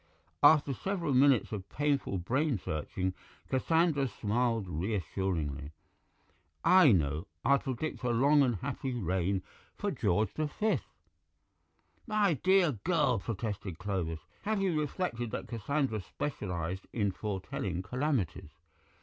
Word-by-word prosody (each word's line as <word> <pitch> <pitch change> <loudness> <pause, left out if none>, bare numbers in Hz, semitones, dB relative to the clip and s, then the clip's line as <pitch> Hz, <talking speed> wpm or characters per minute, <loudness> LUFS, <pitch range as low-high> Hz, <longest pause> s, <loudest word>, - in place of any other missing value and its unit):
After 150 -3 +6
several 170 -1 -2
minutes 130 -2 +4
of 100 -3 -5
painful 140 -8 0
brain 130 - 0
searching, 90 +3 -3 0.4
Cassandra 155 +1 +2
smiled 115 0 0
reassuringly. 85 -5 -2 0.9
"I 180 -7 +7
know. 80 -2 +1 0.2
I'll 140 0 +5
predict 135 +4 -4
a 125 - -1
long 140 +5 +4
and 125 -4 +3
happy 130 +3 -3
reign 95 -2 0 0.3
for - - -2
George 105 +2 +1
the 155 -1 -1
Fifth." 215 +9 -1 1.2
"My 210 -5 +3
dear 185 +3 +4
girl," 150 - +2
protested 100 -4 -4
Clovis, 90 -5 -3 0.2
"have 215 0 0
you 185 -5 +1
reflected 135 - -2
that - - -5
Cassandra 120 0 -1
specialized 90 - -4
in 100 -4 0
foretelling 95 -2 -3
calamities?" 100 - -1
115 Hz, 115 wpm, -31 LUFS, 95-145 Hz, 1.2 s, I